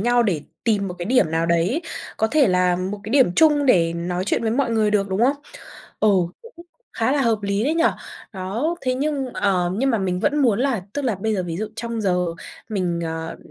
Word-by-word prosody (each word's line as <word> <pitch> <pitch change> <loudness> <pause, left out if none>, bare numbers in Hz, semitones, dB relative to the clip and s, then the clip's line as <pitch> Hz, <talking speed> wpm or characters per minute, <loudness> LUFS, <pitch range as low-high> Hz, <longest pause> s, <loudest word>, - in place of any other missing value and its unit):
nhau, 240 +2 +3
để 185 -9 0 0.2
tìm 205 -4 +1
một 180 - -6
cái 175 - -4
điểm 250 -10 +3
nào 165 +1 0
đấy, 170 - +1 0.3
có 220 - +2
thể 280 0 +3
là 180 -1 +2
một 190 +3 -4
cái 215 - -6
điểm 260 -9 +4
chung 295 -3 +4
để 170 -8 +4
nói 175 +2 -3
chuyện 210 - 0
với 225 - 0
mọi 255 +1 0
người 220 -2 +2
được, 200 -1 +1
đúng 190 +2 -1
không? 280 +2 +2 0.6
Ừ, 215 - +4 0.3
cũng 355 -7 -14 0.3
khá 230 +4 0
là 285 -2 +2
hợp 230 -2 +2
lý 200 +2 0
đấy 305 +4 +1
nhỉ. 335 - +2 0.5
Đó, 220 - -2
thế 255 -1 0
nhưng, 280 0 -1
ờ, 185 -4 +1
nhưng 270 +5 +1
mà 225 - +1
mình 185 -2 -1
vẫn 295 +5 +1
muốn 240 -8 +3
là 255 -8 0
tức 290 - -3
là 235 - +1
bây 215 +3 -2
giờ 185 - -1
ví 170 -2 -4
dụ 215 +2 -3
trong 230 -1 -4
giờ 180 -3 +1 0.4
mình, 180 -5 -1
ờ, 160 0 -5
215 Hz, 230 wpm, -22 LUFS, 180-260 Hz, 0.6 s, điểm